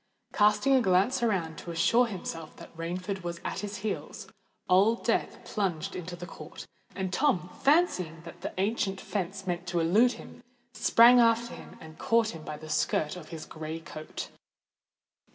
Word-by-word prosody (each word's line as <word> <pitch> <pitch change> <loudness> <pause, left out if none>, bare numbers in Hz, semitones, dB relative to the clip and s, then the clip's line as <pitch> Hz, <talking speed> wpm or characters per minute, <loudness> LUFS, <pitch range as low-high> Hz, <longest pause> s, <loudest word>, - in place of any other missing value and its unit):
Casting 210 +6 +4
a 260 - +5
glance 200 +6 +2
around, 185 -8 0
to - - -9
assure 190 +9 +3
himself 165 -6 -6
that - - -13
Rainford 180 +4 -4
was 170 0 -5
at - - -3
his 205 0 -5
heels, 215 - -4 0.4
Old 200 +6 +3
Death - - -1
plunged 190 -3 -2
into 180 0 -6
the 175 - -8
court; - - -10 0.3
and 190 -1 -3
Tom, 185 -9 +1
fancying 185 - +2
that 170 - -11
the - - -4
ancient 195 -1 0
fence 195 -1 -4
meant 175 0 -3
to 175 -1 0
elude 210 +10 +4
him, - - -12 0.3
sprang 240 +2 +6
after 235 +1 +3
him - - -11
and 160 0 -13
caught 230 -1 +2
him 165 -6 -8
by 150 -1 -6
the 155 +1 -10
skirt 155 0 0
of 165 -4 -10
his 165 -2 -7
grey 160 +1 -6
coat. 155 -1 -7
185 Hz, 170 wpm, -29 LUFS, 165-225 Hz, 0.4 s, sprang